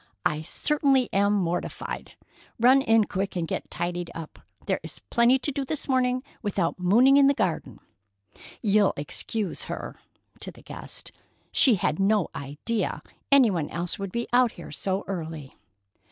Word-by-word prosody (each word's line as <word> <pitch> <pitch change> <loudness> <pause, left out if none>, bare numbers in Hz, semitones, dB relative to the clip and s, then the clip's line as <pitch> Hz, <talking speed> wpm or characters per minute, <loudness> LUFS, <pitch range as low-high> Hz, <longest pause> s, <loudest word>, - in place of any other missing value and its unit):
I 155 -3 +1
certainly 270 - +1
am 200 +1 +3
mortified. 175 -4 -3 0.5
Run 255 +4 +6
in 225 -3 +4
quick 195 -1 -3
and 170 -2 -1
get - - -4
tidied 175 0 -3
up. 165 -2 -8 0.3
There's - - -3
plenty 240 +2 +5
to 280 +3 -2
do 280 0 -2
this 290 +3 -3
morning, 255 -1 +1 0.2
without 190 -5 -1
mooning 240 +10 +5
in 280 -1 +6
the 280 - +3
garden. 160 - -2 0.8
You'll 205 -1 +4
excuse 195 +7 -3
her"—to - - -9
the - - -17
guest. - - -8 0.4
"She 250 -5 +5
had 165 -3 -1
no 200 -1 +2
idea 145 +11 -3 0.3
any 265 -6 +6
one 165 -5 -2
else 175 +2 -4
would 195 -1 -4
be 235 +3 -2
out 245 -1 +4
here - - -10
so 190 0 -2
early." 160 -7 -6
200 Hz, 150 wpm, -26 LUFS, 175-250 Hz, 0.8 s, Run